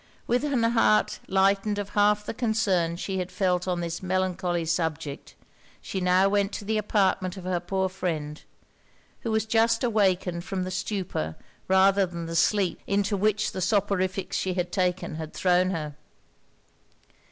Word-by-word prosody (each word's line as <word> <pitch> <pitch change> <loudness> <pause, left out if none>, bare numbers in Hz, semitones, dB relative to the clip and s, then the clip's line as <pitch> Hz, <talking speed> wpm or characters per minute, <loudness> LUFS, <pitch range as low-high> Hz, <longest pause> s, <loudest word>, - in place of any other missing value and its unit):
With 245 +3 +1
an 275 -6 +1
heart 230 -2 +3
lightened 195 +2 +2
of 205 -1 -4
half 210 0 +2
the - - -4
concern 210 -8 +1
she 190 +2 -3
had 180 0 -4
felt 180 -2 0
on 180 -1 -1
this 170 -1 -4
melancholy 180 -2 -1
subject, 160 -3 -3 0.4
she 190 - -5
now 180 +1 +4
went 200 0 +1
to 205 - -5
the 215 +1 0
apartment 195 -3 0
of 190 - -8
her 180 -1 -1
poor 190 +2 -1
friend, 160 -5 -4 0.8
who 230 - -4
was 220 0 +1
just 225 +1 +2
awakened 190 -6 +1
from 190 0 -3
the 185 - -4
stupor 185 - -3 0.3
rather 190 +1 +4
than 170 -1 -6
the 165 0 -5
sleep 190 +2 +2
into 200 +1 +1
which 215 +2 +1
the 185 - -5
soporifics 195 -2 0
she 185 -1 -1
had 180 -1 -2
taken 180 -3 -1
had 160 -1 -7
thrown 180 0 +3
her. 155 -5 -3
190 Hz, 160 wpm, -26 LUFS, 180-205 Hz, 0.8 s, now